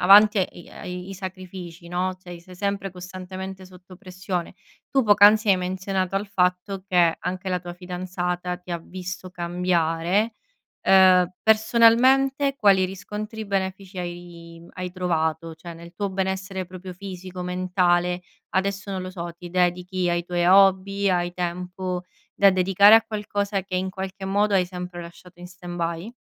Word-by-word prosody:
avanti 205 +3 +7
e 185 -2 -2
i - - -15
ai 180 +1 -7
i - - -6
sacrifici, 185 -2 -8
no, 180 +2 -1
cioè 175 -1 -9
sei 180 +2 -14
sempre 200 +1 -2
costantemente 185 +1 -8
sotto 185 0 -15
pressione. 185 -1 -5 0.4
Tu 270 -1 +3
poc'anzi 210 0 +6
hai 195 - +6
menzionato 185 +1 -2
al 200 +2 -1
fatto 185 +1 0
che 175 -4 +3
anche 185 +1 -4
la 180 -1 0
tua 175 0 -8
fidanzata 180 0 -4
ti 180 0 -13
ha 170 - -1
visto 185 +2 -7
cambiare, 175 +3 0 0.5
uhm, 185 -2 +6
personalmente 245 +5 +4
quali 200 -7 +4
riscontri 210 +3 -6
benefici 190 -1 -3
hai 175 -1 -8
hai 180 -1 -5
trovato? 165 -2 -1
Cioè, 170 +1 -9
nel 170 +1 -12
tuo 200 -1 -2
benessere 190 0 -2
proprio 185 +1 -9
fisico, 185 -1 -8
mentale, 180 -1 +1 0.3
adesso 195 +1 -1
non 190 -1 -3
lo 185 - -6
so, 170 -2 -6
ti 175 0 -10
dedichi 180 0 0
ai 175 0 0
tuoi 175 0 -1
hobby, 195 +1 +4
hai 175 -1 0
tempo 180 +1 -4 0.3
da 200 -1 +6
dedicare 195 +3 +6
a 225 - +7
qualcosa 205 -2 -2
che 185 0 -7
in 185 +1 -1
qualche 190 +1 -6
modo 205 +2 +1
hai 185 -2 +4
sempre 180 -1 -7
lasciato 175 +1 -14
in 180 - -9
stand 180 -1 -9
by? 170 +5 -3
185 Hz, 155 wpm, -24 LUFS, 180-195 Hz, 0.5 s, avanti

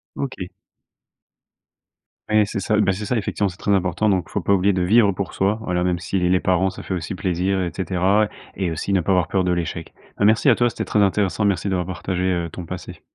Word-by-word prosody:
OK. 130 -10 -4 1.8
Ouais 110 0 +4
c'est 100 - -4
ça, 105 +3 0
bah, 105 -2 +3
c'est 100 +3 -4
ça 125 - -1
effectivement 105 -1 -1
c'est 90 - -6
très 100 - -2
important, 95 +2 +1
donc 95 -4 +1
il - - -17
faut - - -1
pas - - -1
oublier 100 +1 +3
de 90 - 0
vivre 100 +2 +4
pour 95 0 -4
soi, 100 +3 0
voilà 90 -3 -1
même 90 -1 +1
si 90 +2 -2
les 90 +1 +2
parents 95 +1 +2
ça 95 - -9
fait - - -4
aussi 90 +1 -4
plaisir 95 +1 -1
et 85 - -3
cetera, 95 +3 +1 0.3
et 95 -3 -1
aussi 85 +4 -3
ne 95 - +3
pas 95 +3 +1
avoir 90 -2 +1
peur 95 -2 +1
de 90 - +2
l'échec. 85 -1 -4 0.2
Bah, 100 - +2
merci 110 +6 +4
à 120 - +6
toi, 120 +1 +2
c'était - - -4
très 105 - 0
intéressant, 100 0 +1
merci 100 0 0
d'avoir 90 -2 -1
partagé, 90 0 -3
heu, 85 -2 0
ton 90 - -7
passé. 90 +2 -8
95 Hz, 235 wpm, -22 LUFS, 90-100 Hz, 1.8 s, à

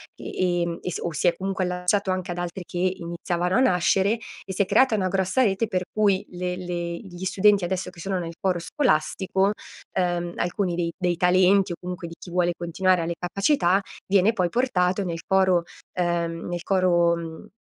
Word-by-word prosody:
ehm, 175 -2 -1
e 180 - -4
s - - -3
o 170 - -3
si 155 - +1
è 175 - +3
comunque 190 0 -2
allacciato 180 +2 0
anche 185 -1 -2
ad 175 - -4
altri 175 +1 -4
che 175 - -7 0.2
iniziavano 175 0 -2
a - - +4
nascere, 195 0 +3 0.3
e - - -6
si 185 - 0
è - - +3
creata 260 +4 +4
una 190 -3 0
grossa 190 +6 +1
rete 215 -1 +2
per 185 -3 -1
cui 205 -2 +2
le 180 0 -3
le 175 -1 -4
gli 185 -3 -10
studenti 195 +1 +3
adesso 185 +1 -2
che 165 - -12
sono 190 0 -2
nel 170 -1 -5
coro 185 -4 0
scolastico, 190 - +1 0.4
ehm, 175 -1 -1
alcuni 175 0 -1
dei 170 -1 -1
dei 180 -2 0
talenti 185 +2 +4
o - - -2
comunque 180 -1 -6
di 165 - -10
chi - - -10
vuole 175 -1 +2
continuare 180 +1 +1
e - - -1
ha - - -3
le 170 - -2
capacità, 190 - +2 0.3
viene 200 +3 +3
poi 180 -5 0
portato 190 -5 +1
nel 165 -2 -4
coro, 190 -3 +3 0.3
ehm, 170 -2 -1
nel 175 0 -4
coro, 175 -3 +3
mhmm, 165 -1 -8
180 Hz, 200 wpm, -24 LUFS, 175-190 Hz, 0.4 s, a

